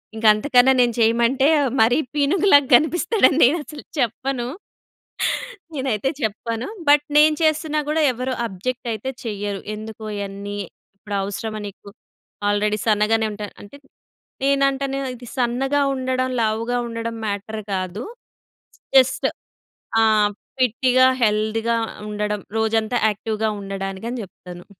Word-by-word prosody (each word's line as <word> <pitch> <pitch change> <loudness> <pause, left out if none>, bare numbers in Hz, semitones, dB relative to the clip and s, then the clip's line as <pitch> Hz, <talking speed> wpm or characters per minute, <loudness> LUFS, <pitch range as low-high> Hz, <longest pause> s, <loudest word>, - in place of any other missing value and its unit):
ఇంక 220 0 -4
అంతకన్నా 255 +3 +4
నేను 240 -1 +2
చేయమంటే, 235 +4 +3 0.3
మరీ 240 +4 +4 0.2
పీనుగులాగా 290 0 +4
కనిపిస్తాడని, 335 - +3
నేను 300 +7 +3
అసలు 295 -1 -10 0.2
చెప్పను, 245 +1 -1 1.3
నేనైతే 265 -3 -1
చెప్పను. 225 +2 -3 0.2
బట్, 295 0 +5
నేను 305 0 +6
చేస్తున్నా 310 0 +1
కూడా 315 +1 +1
ఎవరు 255 +2 -3
అబ్జెక్ట్ 235 +6 -5
అయితే 220 +5 -4
చెయ్యరు. 205 -3 -3 0.2
"ఎందుకు 220 +1 -9
ఇయన్నీ, 200 0 -5 0.4
ఇప్పుడు 205 0 -6
అవసరమా 215 +2 -4
నీకు? 200 0 -12 0.6
ఆల్రెడీ 210 +1 +1
సన్నగానే 220 +1 +2
ఉంటా" 205 0 -6 0.2
అంటే, 205 +8 -13 0.7
నేనంటాను, 275 0 +1 0.2
ఇది 245 0 -12
సన్నగా 265 +4 +1
ఉండడం, 255 0 -1
లావుగా 225 +2 0
ఉండడం 230 0 -4
మ్యాటర్ 215 +1 -4
కాదు. 185 +4 -3 0.9
జస్ట్ 260 0 +4 0.8
ఆహ్, 215 -2 +4 0.3
ఫిట్‌గా, 255 +1 +3 0.2
హెల్త్‌గా 220 +2 +1 0.3
ఉండడం, 210 0 -2 0.2
రోజంతా 220 +2 +1
యాక్టివ్‍గా 215 +1 -2
ఉండడానికి 195 +1 -5
అని 245 -1 -4
చెప్తాను. 180 -1 -12
230 Hz, 115 wpm, -21 LUFS, 210-265 Hz, 1.3 s, నేను